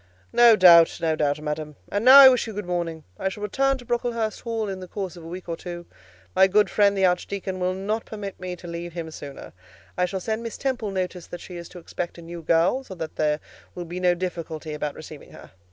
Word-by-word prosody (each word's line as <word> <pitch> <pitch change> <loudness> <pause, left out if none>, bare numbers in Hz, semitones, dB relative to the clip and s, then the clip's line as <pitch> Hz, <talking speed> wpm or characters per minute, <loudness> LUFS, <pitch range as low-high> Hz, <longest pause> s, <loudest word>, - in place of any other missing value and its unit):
"No 235 -2 +7
doubt, 170 -4 +7
no 160 -1 +1
doubt, 145 -1 0
madam; 150 0 -4 0.2
and 205 +1 -1
now 260 +3 +10
I 275 -1 +12
wish 250 -2 +1
you 220 - -6
good 205 -1 -5
morning. 170 -3 -3 0.2
I 190 - 0
shall 205 +2 -8
return 270 +6 +1
to 245 - -13
Brocklehurst 235 -2 -2
Hall 225 -2 -3
in 190 -1 -5
the 185 - -8
course 190 -1 -5
of 170 - -11
a - - -9
week 180 +2 -8
or 165 - -3
two: 175 0 -8 0.5
my 190 - +6
good 205 +1 +3
friend, 200 -1 +3
the 190 - +3
Archdeacon, 185 +1 -1
will 180 0 0
not 210 +4 -3
permit 205 -3 -7
me 180 0 -5
to 175 - -12
leave 170 0 -6
him 165 -2 -6
sooner. 140 -2 -10 0.4
I 180 - +2
shall 190 +1 -4
send 220 +4 -3
Miss 230 -2 -6
Temple 255 -6 -2
notice 185 -2 -4
that 175 - -8
she 180 - -10
is 170 -1 -8
to - - -12
expect 175 0 -6
a 170 - -11
new 170 0 -8
girl, 170 +11 +2
so 190 - -10
that 160 -2 -6
there 150 0 +1 0.4
will 175 - -5
be 175 +2 -6
no 180 -1 +3
difficulty 165 -3 -5
about 150 -1 -4
receiving - - -11
her. - - -13
180 Hz, 240 wpm, -24 LUFS, 170-210 Hz, 0.5 s, I